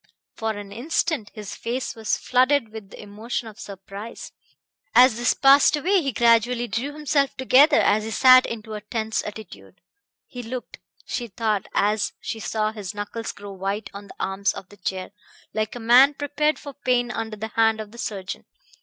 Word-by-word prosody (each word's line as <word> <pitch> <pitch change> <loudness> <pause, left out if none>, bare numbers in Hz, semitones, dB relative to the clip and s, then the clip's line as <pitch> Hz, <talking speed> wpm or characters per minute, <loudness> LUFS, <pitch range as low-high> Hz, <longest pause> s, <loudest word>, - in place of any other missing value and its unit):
For 220 -1 -3
an 205 -1 -9
instant 265 0 -1
his 210 -2 -7
face 245 +3 -3
was 220 -1 -1
flooded 255 -1 +2
with 215 -2 -10
the - - -13
emotion 220 +3 -5
of 220 +1 -12
surprise. 200 +1 -9 0.6
As 250 -1 +7
this 240 0 +2
passed 275 +2 +6
away 370 +5 +2
he 275 -3 -1
gradually 235 +1 +3
drew 235 +8 -3
himself 295 -2 0
together 275 +3 +5
as 215 +1 +3
he 220 - -5
sat 255 +3 +6
into 220 -1 -7
a 210 - -5
tense 220 +1 -2
attitude. 100 - -10 0.5
He 250 - -8
looked, 245 +1 -7 0.3
she 240 - -4
thought 215 -1 -2
as 210 +1 +1
she 225 - -5
saw 215 -1 -1
his 210 -2 -7
knuckles 210 +2 -5
grow 200 0 -10
white 195 +2 -4
on 200 0 -9
the - - -13
arms 195 +1 -1
of 190 - -9
the 205 - -16
chair, 185 0 -4 0.4
like 215 +1 -2
a - - -6
man 250 +5 +6
prepared 290 +1 0
for 285 0 -9
pain 250 -3 0
under 225 -2 -4
the 220 +2 -5
hand 225 0 +2
of 215 -1 -7
the 235 - -13
surgeon. 195 -5 -5
225 Hz, 180 wpm, -23 LUFS, 210-255 Hz, 0.6 s, As